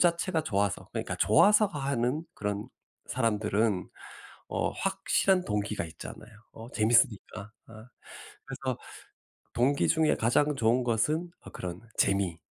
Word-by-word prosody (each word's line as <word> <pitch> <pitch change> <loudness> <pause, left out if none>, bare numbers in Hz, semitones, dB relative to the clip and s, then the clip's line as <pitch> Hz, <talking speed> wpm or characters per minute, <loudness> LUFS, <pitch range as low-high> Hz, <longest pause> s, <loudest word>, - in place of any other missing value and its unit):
자체가 170 0 +2
좋아서 100 -3 -1
그러니까 - - -3
좋아서 210 - +5
하는 140 -4 -1
그런 105 0 -3 0.4
사람들은 105 -4 0 0.6
어 - - -1
확실한 195 -1 +1
동기가 105 -2 -2
있잖아요 85 - -10 0.2
어 115 +2 -11
재밌으니까. 110 -3 +1 0.2
어 - - -13 0.7
그래서 - - -4 0.8
동기 135 +4 +2
중에 160 -1 +3
가장 145 +6 +2
좋은 120 +1 +2
것은 150 +9 0
어 - - -12
그런 90 -1 -6 0.2
재미 95 -4 +1
115 Hz, 275 characters per minute, -29 LUFS, 105-150 Hz, 0.8 s, 좋아서